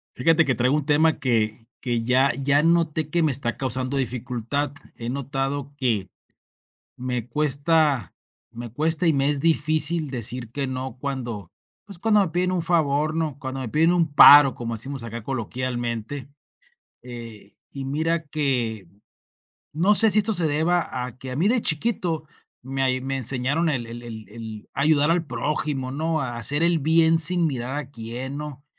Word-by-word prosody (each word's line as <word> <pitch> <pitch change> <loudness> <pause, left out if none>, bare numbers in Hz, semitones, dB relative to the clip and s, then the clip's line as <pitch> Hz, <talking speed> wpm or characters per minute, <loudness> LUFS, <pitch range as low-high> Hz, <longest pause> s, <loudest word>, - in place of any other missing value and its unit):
Fíjate 165 +5 +3
que 130 - +1
traigo 125 +5 +2
un 150 -2 -1
tema 155 +2 +3
que 115 -3 -1 0.2
que 120 -2 -1
ya 130 +3 +3
ya 140 +2 +2
noté 160 -2 +1
que 170 +1 +1
me 155 - +2
está 120 -3 -1
causando 130 +1 0
dificultad. 125 +2 -2 0.2
He 115 0 -4
notado 140 +1 -3
que 110 -8 -1 0.9
me 125 -2 -3
cuesta 145 - +1 0.4
me 120 -1 -8
cuesta 160 +6 0
y 160 - +4
me 140 0 +2
es 145 -1 0
difícil 155 0 +2
decir 120 -1 -3
que 140 +2 -2
no 130 -1 -5
cuando, 120 - -5 0.3
pues 195 -3 -8
cuando 210 +1 +3
me 190 - 0
piden 180 +2 0
un 180 -2 -1
favor, 155 -3 +1
¿no?, 160 -4 -2
cuando 135 -2 -5
me 130 -3 -5
piden 160 +7 +3
un 165 -4 +1
paro 145 -2 +9
como 115 -1 -5
decimos 130 +3 -5
acá 115 0 -6
coloquialmente, 120 +1 -4 0.7
eh, 115 -5 -9 0.2
y 140 - -6
mira 160 +4 -1
que 125 - -1 0.9
no 185 +7 +3
sé 225 +1 +5
si 210 - +3
esto 215 +1 +2
se 170 -3 +1
deba 155 -4 0
a 125 -2 -8
que 130 0 -8
a 125 - -5
mí 170 - +1
de 240 0 +1
chiquito 165 -2 -1 0.4
me 135 +1 -3
ay 130 -1 +1
me 135 +1 -3
enseñaron 135 +6 0
el 120 -5 -2
el 120 +1 -8
el 110 -3 -9
el 110 -1 -9
a - - -3
ayudar 150 0 +3
al 170 -1 0
prójimo, 135 0 -3
¿no?, 160 +2 -1
a 120 -3 -4
hacer 140 +7 +1
el 170 -1 +3
bien 160 +2 +4
sin 175 +1 +4
mirar 130 -2 -3
a 140 -2 -7
quién, 125 +3 -5
¿no? 145 -2 -8
140 Hz, 175 wpm, -23 LUFS, 125-160 Hz, 0.9 s, paro